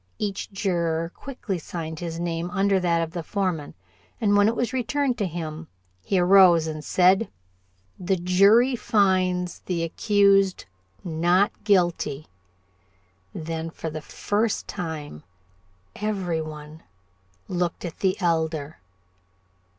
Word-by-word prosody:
Each 205 -1 -4
juror 170 -4 -1
quickly 240 -9 -5
signed 160 -1 -6
his 170 -1 -5
name 170 0 -2
under 195 0 +2
that 170 -2 +1
of 165 - -5
the 170 0 -4
foreman, 180 -4 -3 0.4
and 205 -2 +2
when 205 0 +5
it 230 - +1
was 240 +2 -1
returned 260 +1 0
to 200 - 0
him, 160 -1 -6 0.4
he 195 - 0
arose 180 -2 +6
and 155 -1 -5
said: 185 +7 +3 0.7
"The 190 +1 0
jury 200 +8 +4
finds 185 -6 +1
the 170 -2 -3
accused 195 +2 +2 0.4
not 175 +4 +2
guilty." 175 -7 +1 1.1
Then 165 0 -4
for 165 -1 -6
the 155 0 -6
first 210 +7 -1
time 155 - -6 0.7
every 190 -6 -2
one 155 0 -9 0.7
looked 175 -1 -2
at 170 - -7
the 190 -1 +1
Elder. 160 -4 -1
180 Hz, 120 wpm, -24 LUFS, 165-200 Hz, 1.1 s, arose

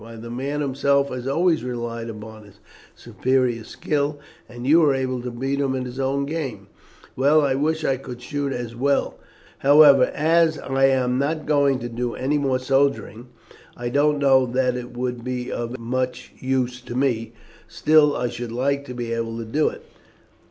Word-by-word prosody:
why 115 0 -11
the 115 +1 -9
man 140 +4 -3
himself 140 0 +1
had 125 0 -5
always 165 +3 +2
relied 120 -2 -4
upon 110 0 -9
his 100 -2 -18 0.4
superior 125 -3 0
skill, 145 +4 -2 0.3
and 120 +1 -8
you 155 +5 +6
were 145 -4 +4
able 130 -1 -2
to 125 - -4
beat 135 +4 -3
him 135 -2 0
at 130 - -2
his 125 +1 -7
own 135 +1 0
game. 150 -5 -4 0.5
Well, 145 +4 +4
I 140 -2 +1
wish 155 +4 0
I 135 - +1
could 125 -2 -9
shoot 140 +2 -3
as 120 -2 -5
well. 140 +4 0 0.4
However, 140 -2 +7
as 160 +1 +2
I 135 0 +1
am 130 -1 +2
not 155 +2 -1
going 140 -3 +3
to 120 - -4
do 120 0 -3
any 145 +3 0
more 135 -2 +1
soldiering, 130 -3 0 0.5
I 120 0 -3
don't 145 +3 +2
know 135 -2 +4
that 125 0 0
it 125 0 -7
would 125 -1 -3
be 125 0 -4
of 120 +1 -4
much 125 +2 -3
use 125 -1 -1
to 120 - -8
me; 125 -4 0 0.3
still 150 -1 +3
I 125 - -1
should 120 -1 -6
like 140 +4 -1
to 125 - -8
be 120 -1 -3
able 115 0 -3
to 115 - -5
do 150 +8 +1
it." - - -12
130 Hz, 185 wpm, -23 LUFS, 120-140 Hz, 0.5 s, However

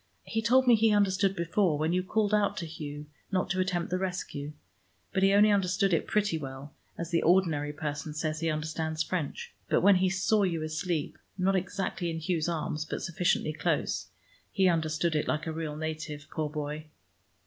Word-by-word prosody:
He 225 - -2
told 255 +4 +4
me 245 - +6
he 225 0 +5
understood 195 -1 +2
before, 170 -1 +1
when 155 +3 0
you 180 - +2
called 210 +2 0
out 210 -1 +2
to 170 - -3
Hugh 150 -2 -7 0.3
not 185 -2 0
to 185 - 0
attempt 180 -2 -1
the 185 - 0
rescue. 175 -6 -4 0.6
But 190 - +1
he 195 0 +5
only 205 +1 +6
understood 195 -1 +2
it 165 - +1
pretty 205 -6 +1
well, 135 +1 -8 0.2
as 170 0 -5
the 165 - +2
ordinary 165 -5 +3
person 150 0 -4
says 155 0 -2
he 165 0 0
understands 155 0 -2
French. 160 -4 -4 0.2
But - - +3
when 200 0 +6
he 185 0 +2
saw 195 +3 +2
you 170 -5 0
asleep, 155 0 -2 0.2
not 190 +1 +2
exactly 185 -1 -2
in 165 - -3
Hugh's 165 -1 -1
arms, 155 -2 -2
but 155 - -5
sufficiently 170 -2 0
close, - - -1 0.4
he 190 -2 +3
understood 160 -1 +1
it 150 - 0
like 155 - -1
a 160 - -3
real 155 -2 -4
native, 155 -1 -5
poor 155 -2 -2
boy!" 150 +1 -5
170 Hz, 190 wpm, -29 LUFS, 155-190 Hz, 0.6 s, me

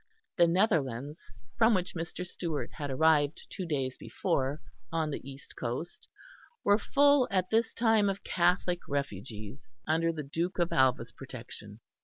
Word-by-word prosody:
The 170 -2 +5
Netherlands, 150 - 0 0.3
from 225 0 +6
which 180 -1 -1
Mr. 175 +1 -4
Stewart 170 -4 -4
had 145 -3 -5
arrived 150 +1 +3
two 185 -3 -5
days 135 -4 -2
before, 135 +3 -1 0.3
on 160 -2 0
the - - -4
east 135 +1 -12
coast, 125 +8 -5 0.6
were 205 +1 +4
full 285 +2 +4
at 185 -3 0
this 225 +1 +2
time 225 -3 +3
of 195 0 -4
Catholic 180 0 +1
refugees, 115 -3 -5
under 165 +2 +2
the 155 -2 -5
Duke 165 +6 -2
of 175 -1 +1
Alva's 125 -3 +3
protection. 115 -5 -10
160 Hz, 145 wpm, -30 LUFS, 135-185 Hz, 0.6 s, from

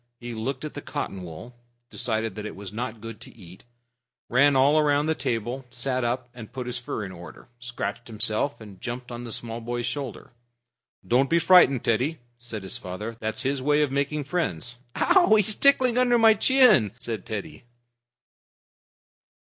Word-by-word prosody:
He 120 0 -6
looked 130 +6 -4
at 150 - -6
the 145 - -6
cotton 120 -12 -5
wool, 90 +8 -9 0.4
decided 110 -2 -1
that 105 +1 -7
it - - -8
was 100 0 -8
not 115 -1 -4
good 115 -1 -8
to - - -12
eat, 90 -2 -13 0.7
ran 140 +3 +4
all 145 +4 +5
round 145 0 +2
the 160 - +2
table, 120 -1 -3
sat 130 +1 -2
up 120 +1 -1
and 115 -3 -10
put 125 0 -5
his 125 0 -3
fur 110 -3 -4
in 95 - -7
order, 85 +4 -12
scratched 120 0 -5
himself, 110 +4 -1
and 105 -4 -12
jumped 125 +1 -5
on 120 0 -6
the 115 - -7
small 115 +1 -3
boy's 120 +1 -3
shoulder. 125 -1 -5 0.7
"Don't 130 +3 +3
be 170 - +4
frightened, 170 -8 +6
Teddy," 130 +8 +1 0.2
said 115 -4 -7
his 95 - 0
father. 105 +5 -6
"That's 110 0 -3
his 135 0 -1
way 150 +2 +3
of 145 - -1
making 140 +2 -1
friends." 125 - -3 0.2
"Ouch! 350 - +4
He's 215 - -2
tickling 255 -3 +4
under 245 -1 +4
my 225 -1 +7
chin," 215 - +5
said 110 -5 -5
Teddy. 110 +2 -6
120 Hz, 175 wpm, -25 LUFS, 110-145 Hz, 0.7 s, my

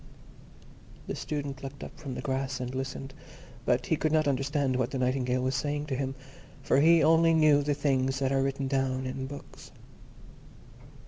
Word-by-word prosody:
The - - -4
Student 140 -2 -4
looked 135 +1 -8
up - - -9
from 140 -5 -6
the - - -5
grass, 135 0 -2
and 125 0 -4
listened, 135 0 -5 0.5
but 125 0 +2
he 160 - +1
could 155 0 0
not 155 -1 +3
understand 140 0 0
what 125 -1 0
the 135 - -3
Nightingale 125 0 0
was 130 +1 0
saying 145 +3 -1
to 140 -3 -3
him, 135 0 -2 0.5
for - - +3
he 165 +2 +6
only 165 +1 +5
knew 155 -2 +5
the 145 0 0
things 135 -2 +1
that 135 -1 0
are 135 0 +2
written 135 0 -1
down 130 -1 0
in 130 +1 -4
books. 140 +1 -11
135 Hz, 180 wpm, -29 LUFS, 130-145 Hz, 0.5 s, he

